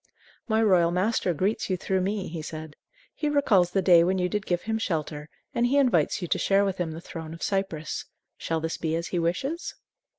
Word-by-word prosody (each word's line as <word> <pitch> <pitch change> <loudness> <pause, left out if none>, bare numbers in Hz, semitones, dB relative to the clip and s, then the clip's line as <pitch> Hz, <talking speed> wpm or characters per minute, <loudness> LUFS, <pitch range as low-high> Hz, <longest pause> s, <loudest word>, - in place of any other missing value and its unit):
"My 220 -1 +2
royal 180 -5 +4
master 185 +2 +1
greets 190 +8 -1
you 185 - +1
through 190 +1 0
me," 195 +1 -2
he 165 0 -5
said. 155 -1 -7 0.4
"He 300 - -1
recalls 220 -12 +3
the 190 +1 0
day 175 -3 +7
when 185 +2 +1
you 180 0 0
did 210 0 -3
give 175 -1 0
him 220 0 -1
shelter, 155 -6 -3 0.2
and 240 +1 +2
he 275 +3 +2
invites 200 - +2
you - - -2
to - - +1
share 200 +1 +3
with 195 -2 -2
him 175 -2 -1
the 165 - -8
throne 160 -1 -7
of 165 - -9
Cyprus. 190 -6 -2 0.3
Shall 165 -1 -2
this 160 0 -3
be 160 -1 -1
as 170 +1 -3
he 180 - -1
wishes?" 265 - -2
180 Hz, 220 wpm, -26 LUFS, 165-205 Hz, 0.4 s, day